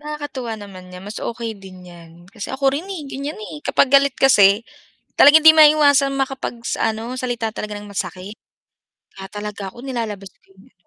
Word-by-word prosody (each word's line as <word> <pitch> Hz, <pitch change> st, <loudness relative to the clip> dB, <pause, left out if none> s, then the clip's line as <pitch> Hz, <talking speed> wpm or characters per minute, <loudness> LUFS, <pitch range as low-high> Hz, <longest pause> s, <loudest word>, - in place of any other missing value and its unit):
Nakakatuwa 290 Hz, -6 st, -6 dB
naman 195 Hz, -3 st, -12 dB
nga 180 Hz, 0 st, -11 dB
mas 205 Hz, +2 st, -7 dB
okay 230 Hz, -1 st, -5 dB
din 190 Hz, -3 st, -14 dB
'yan. 170 Hz, -2 st, -14 dB, 0.2 s
Kasi 220 Hz, -4 st, -7 dB
ako 270 Hz, 0 st, +1 dB
rin, 310 Hz, +7 st, -4 dB
eh, 375 Hz, -5 st, -6 dB
ganiyan, 280 Hz, +2 st, -6 dB
eh, 185 Hz, -8 st, -9 dB
kapag 260 Hz, -, +1 dB
galit 280 Hz, -1 st, +4 dB
kasi, 210 Hz, -4 st, +4 dB, 0.5 s
talagang 305 Hz, +2 st, +7 dB
hindi 320 Hz, -, +10 dB
maiwasan 285 Hz, -3 st, +5 dB
makapag 270 Hz, -2 st, -3 dB
sa 225 Hz, -, -1 dB
ano 230 Hz, +3 st, -6 dB
salita 240 Hz, -3 st, -3 dB
talaga 210 Hz, -1 st, -6 dB
ng 205 Hz, 0 st, -10 dB
masakit. 195 Hz, +1 st, -6 dB, 0.8 s
Kaya 190 Hz, 0 st, -10 dB
talaga 205 Hz, -1 st, -6 dB
ako 240 Hz, -, -13 dB
nilalabas 220 Hz, -7 st, -5 dB
ko -, -, -39 dB
'yung 190 Hz, +1 st, -22 dB
230 Hz, 175 wpm, -20 LUFS, 200-275 Hz, 0.8 s, hindi